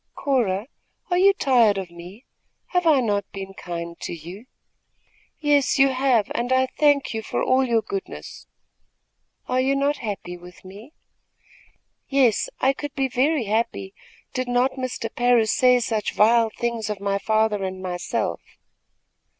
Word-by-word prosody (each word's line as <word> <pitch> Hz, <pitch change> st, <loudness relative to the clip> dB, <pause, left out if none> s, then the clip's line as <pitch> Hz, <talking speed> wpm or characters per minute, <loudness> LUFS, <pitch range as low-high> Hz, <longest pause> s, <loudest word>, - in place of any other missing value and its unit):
"Cora, 225 Hz, -8 st, 0 dB, 0.5 s
are 355 Hz, -, +3 dB
you 395 Hz, +2 st, +6 dB
tired 245 Hz, -, +3 dB
of 185 Hz, -3 st, -5 dB
me? 180 Hz, +8 st, -12 dB, 0.4 s
Have 360 Hz, -2 st, +1 dB
I 295 Hz, -5 st, +5 dB
not 205 Hz, -4 st, -1 dB
been 195 Hz, 0 st, -7 dB
kind 170 Hz, -2 st, -6 dB
to -, -, -5 dB
you?" 180 Hz, +9 st, -11 dB, 0.9 s
"Yes, 290 Hz, -2 st, +2 dB
you 270 Hz, 0 st, +5 dB
have, 255 Hz, -5 st, +1 dB
and 240 Hz, +2 st, -2 dB
I 260 Hz, 0 st, +4 dB
thank 290 Hz, -4 st, +3 dB
you 220 Hz, -, -3 dB
for -, -, -3 dB
all 260 Hz, +1 st, +3 dB
your 230 Hz, -3 st, +1 dB
goodness." 395 Hz, -1 st, -7 dB, 1.0 s
"Are 255 Hz, 0 st, +1 dB
you 270 Hz, +1 st, +1 dB
not 280 Hz, +1 st, +1 dB
happy 200 Hz, -5 st, -6 dB
with 180 Hz, +1 st, -15 dB
me?" 205 Hz, +10 st, -12 dB, 1.2 s
"Yes, 265 Hz, -6 st, +2 dB
I 265 Hz, +1 st, +3 dB
could 290 Hz, 0 st, -7 dB
be 270 Hz, -2 st, 0 dB
very 265 Hz, +3 st, +1 dB
happy, 210 Hz, -2 st, -2 dB, 0.4 s
did 255 Hz, -1 st, -2 dB
not 245 Hz, +2 st, +2 dB
Mr. 255 Hz, -3 st, -5 dB
Parris 240 Hz, -3 st, +3 dB
say 250 Hz, -1 st, +5 dB
such 220 Hz, -3 st, -2 dB
vile 225 Hz, +1 st, +4 dB
things 230 Hz, -1 st, -3 dB
of 210 Hz, -2 st, -3 dB
my 200 Hz, 0 st, -1 dB
father 215 Hz, -1 st, +1 dB
and 185 Hz, 0 st, -4 dB
myself. 180 Hz, -1 st, -3 dB
235 Hz, 150 wpm, -23 LUFS, 200-265 Hz, 1.2 s, you